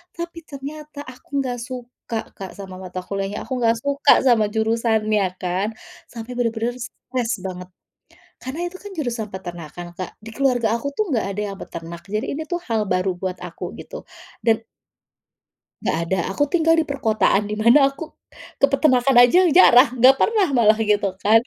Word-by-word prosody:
Tapi 340 0 -6
ternyata 295 +1 -8
aku 250 - -20
enggak 245 -2 -3
suka, 245 -1 -7 0.2
Kak, 190 -2 -7
sama 190 -2 -8
mata 185 0 -6
kuliahnya, 195 +1 -4
aku 260 - -6
enggak 230 -1 +3
suka 280 0 +3
sama 235 -4 +5
jurusannya 220 -2 +1 0.2
kan, 185 +3 -1 0.4
sampai 230 +1 -8
benar-benar 230 0 -1
stres 250 0 -4
banget. 180 -1 -6 0.8
Karena 320 +7 -4
itu 370 - -11
kan 410 -1 -9
jurusan 235 -8 -3
peternakan, 175 -3 -7
Kak. 185 - -5
Di 220 - -11
keluarga 245 -5 +2
aku 260 +5 -4
tuh 430 - 0
enggak 225 -5 0
ada 210 - -4
yang 195 - -8
peternak, 170 +1 -8
jadi 215 +5 -3
ini 315 - -3
tuh 350 0 -1
hal 220 -2 +1
baru 185 +1 +1
buat 185 0 -4
aku - - -7
gitu. - - -9 0.4
Dan 225 -2 +3 1.2
Nggak - - 0
ada, 190 - 0
aku 290 - +1
tinggal 325 +1 +3
di 315 - -1
perkotaan 220 -6 +1
di - - -1
mana 275 +5 +5
aku 295 +3 -8 0.5
ke 275 - +6
peternakan 270 -2 +3
aja 350 +10 +6
jarang, 255 -6 +7
enggak 260 +3 +7
pernah 430 -4 +3
malah 220 -3 +5
gitu 205 -3 +1
kan. 215 +3 +5
235 Hz, 170 wpm, -22 LUFS, 205-275 Hz, 1.2 s, jarang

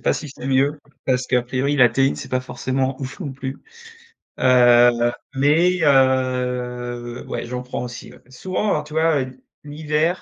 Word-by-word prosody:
pas - - +1
si 150 - -5
c'est 135 - -9
mieux 135 +3 +1 0.3
parce 130 -1 +1
qu'à 125 -1 +2
priori, 130 +4 -1
la 125 -3 +6
théine 135 +3 +1
c'est - - -8
pas 130 - 0
forcément 130 +1 -3
ouf 135 0 -6
non 145 -6 -4
plus, 135 0 -6 0.8
heu, 120 -1 +5 0.2
mais 165 +7 +3
heu, 125 -3 0
ouais - - -4
j'en 125 +1 -5
prends 125 - -5
aussi, 120 -1 -8
ouais. - - -16
P - - -29
souvent, 185 +8 -2
alors 150 -6 0
tu 150 0 -13
vois, 160 -2 +2
heu, 130 0 -11 0.2
l'hiver, 155 +3 -1
130 Hz, 175 wpm, -21 LUFS, 125-145 Hz, 0.8 s, la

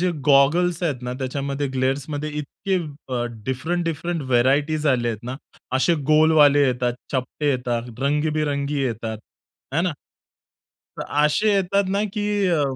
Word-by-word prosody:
जे 180 0 +2 0.2
गॉगल्स 160 +5 +4
आहेत 140 -7 -1
ना, 125 - -3
त्याच्यामध्ये 140 +2 -2
ग्लेअर्समध्ये 145 +3 -1
इतके 190 +6 -4
अ, 140 -7 -4 0.2
डिफरंट-डिफरंट 165 +4 -2
व्हेरायटीज 145 +5 +2
आले 125 -4 +2
आहेत 110 -3 -4
ना. 125 +2 -4 0.4
असे 135 +6 +3 0.2
गोलवाले 150 -2 +5
येतात, 125 -1 0 0.2
चपटे 135 +3 -1
येतात, 125 -2 -2
रंगीबिरंगी 145 0 0
येतात, 115 -3 -3 0.5
आहे 165 - +1
ना? 180 -1 0 1.0
तर - - -4 0.2
असे 205 +8 +3
येतात 200 +1 +2
ना, 200 +2 +1
की 210 -1 -2 0.2
अ 165 -4 +2
145 Hz, 130 wpm, -22 LUFS, 130-165 Hz, 1.0 s, गोलवाले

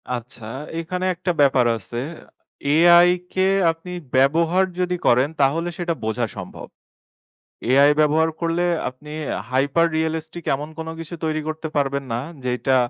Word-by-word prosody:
আচ্ছা, 120 -1 -9 0.3
এখানে 180 +2 -3
একটা 180 +1 -1
ব্যাপার 135 -3 +4
আছে। 120 +3 -7 0.7
AI 175 +2 +7 0.2
কে 190 0 +2 0.2
আপনি 165 +2 -10 0.2
ব্যবহার 165 +7 +3 0.2
যদি 180 0 0
করেন, 125 +4 +4
তাহলে 160 +6 +2
সেটা 175 -1 -1
বোঝা 110 +2 0
সম্ভব। - - -8 1.0
AI 140 +2 +6
ব্যবহার 155 +2 +3
করলে, 170 +1 0 0.2
আপনি 145 +4 -12 0.4
হাইপার 140 +6 +2
রিয়ালিস্টিক 160 +1 -3
এমন 145 +3 -5
কোন 160 - -5
কিছু 165 +1 -7
তৈরি 155 -1 0
করতে 160 0 -4
পারবেন 140 -1 0
না, 115 - -1 0.2
যেটা 125 +1 +1
155 Hz, 135 wpm, -22 LUFS, 135-170 Hz, 1.0 s, AI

